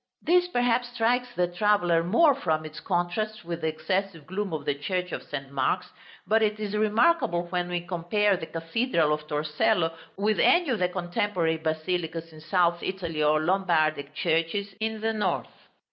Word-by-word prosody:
This 355 +2 +4
perhaps 245 -5 +1
strikes 245 +2 +2
the 180 - +2
traveller 175 -2 +2
more 275 - +5
from 160 - -1
its 155 -1 -8
contrast 180 +4 -2
with 170 -1 -4
the 160 - 0
excessive 185 0 -2
gloom 195 +2 -3
of 155 -3 -4
the 145 - +1
Church 180 +5 -3
of - - -4
St. 140 -2 -7
Mark's; 160 +7 -1 0.3
but 220 +1 +3
it 215 0 +1
is 210 -1 -3
remarkable 215 - +2
when 180 -1 -1
we 175 -1 -1
compare 185 +4 +1
the 160 -3 -6
Cathedral 165 - 0
of 150 0 -4
Torcello 165 +4 +1 0.2
with 210 +2 +1
any 345 -5 +4
of 230 - 0
the 180 -1 +2
contemporary 175 -2 -1
basilicas 165 +1 -3
in 155 - -13
South 170 +1 +1
Italy 170 -5 -3
or 150 +1 +3
Lombardic 155 -5 +1
churches 170 +6 0
in 220 0 -2
the 225 0 0
North. 215 -1 -3
180 Hz, 170 wpm, -27 LUFS, 160-210 Hz, 0.3 s, more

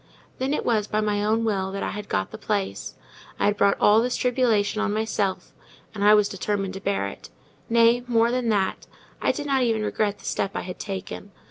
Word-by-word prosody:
Then 260 +2 -1
it 300 - -1
was 215 -3 +1
by 215 - 0
my 210 -1 0
own 220 +2 +1
will 190 -3 -1
that 195 - -4
I - - -2
had 205 0 -7
got 95 - -1
the - - -8
place: 205 -3 -3 0.4
I - - +2
had 205 - +2
brought 200 -1 +3
all 210 +2 +5
this 245 +1 -1
tribulation 235 -5 +1
on 215 -1 0
myself, 210 -3 -2 0.4
and 205 -2 -3
I 210 +1 +7
was 210 -1 +4
determined 195 -1 -2
to 195 - -6
bear 200 - 0
it; 100 - -10 0.4
nay, 235 +1 +4
more 230 -1 +3
than 250 -2 0
that, 195 -3 0 0.3
I - - +3
did 295 - -5
not 270 -2 +1
even 225 -3 +1
regret 210 -1 -1
the - - -16
step 195 - -2
I - - -1
had 180 0 -8
taken. 195 +1 -6
210 Hz, 220 wpm, -24 LUFS, 200-230 Hz, 0.4 s, I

